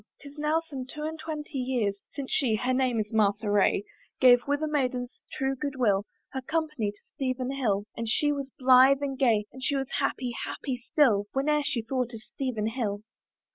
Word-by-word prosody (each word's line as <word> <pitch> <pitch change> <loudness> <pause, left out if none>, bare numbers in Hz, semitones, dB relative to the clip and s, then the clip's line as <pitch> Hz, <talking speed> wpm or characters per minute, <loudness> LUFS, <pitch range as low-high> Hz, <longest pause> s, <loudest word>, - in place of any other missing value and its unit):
Tis 285 0 -12
now 305 +2 +2
some 275 -6 -7
two 300 +3 -7
and 315 +1 -4
twenty 300 -3 -5
years, 245 -5 0 0.2
Since 275 -2 -5
she 245 -7 +2
(her 250 +4 0
name 255 -3 +1
is 210 +1 -3
Martha 210 0 +2
Ray) 205 -1 +3 0.4
Gave 245 -1 +8
with 285 +2 0
a - - +1
maiden's 255 -4 -2
true 270 0 -1
good 280 +1 -4
will 205 -5 +2 0.2
Her 265 - -3
company 300 -6 -1
to 205 - -10 0.2
Stephen 255 -1 -2
Hill; 215 -7 0
And 230 -1 -3
she 295 +5 +3
was 280 -2 -3
blithe 260 +2 +6
and 275 -1 -2
gay, 230 -6 +3
And 260 - -10
she 280 - +1
was 270 -1 -2
happy, 250 -2 -1
happy 265 -3 -3
still 235 -5 +2
Whene'er 300 +2 +2
she 265 -5 -1
thought 250 0 -2
of 220 - -9
Stephen 250 -5 -3
Hill. 215 -4 -3
260 Hz, 195 wpm, -28 LUFS, 225-280 Hz, 0.4 s, Gave